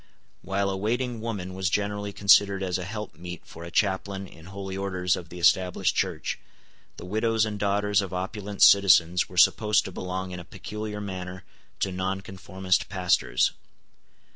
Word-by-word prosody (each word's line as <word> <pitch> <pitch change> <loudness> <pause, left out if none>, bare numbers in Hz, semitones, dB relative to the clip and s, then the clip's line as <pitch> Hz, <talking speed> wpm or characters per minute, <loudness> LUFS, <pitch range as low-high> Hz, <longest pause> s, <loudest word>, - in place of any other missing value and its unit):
While 100 +1 -1
a - - -2
waiting 120 +3 -1
woman 100 -5 -4
was 95 -1 -1
generally 105 +1 -1
considered 100 -1 +4
as 95 -1 -1
a 90 - -5
help 105 0 -6
meet 90 +1 -9
for 85 - -11
a 85 - -7
chaplain 95 +1 0
in 80 -3 -14
holy 95 0 -6
orders 90 -2 0
of 85 -2 -8
the 90 - -9
Established 90 +1 +2
Church, - - -1 0.6
the - - -8
widows 110 +3 +1
and 105 -1 -4
daughters 105 0 +2
of 95 -2 -5
opulent 100 +2 -2
citizens 90 -3 +6
were 90 - -11
supposed 105 +3 +4
to 95 - -6
belong 95 +1 -4
in 90 - -6
a - - -8
peculiar 105 +3 -6
manner 95 -2 -6 0.4
to 95 - +1
nonconformist 95 0 -2
pastors. 90 -10 +2
95 Hz, 165 wpm, -26 LUFS, 90-105 Hz, 0.6 s, citizens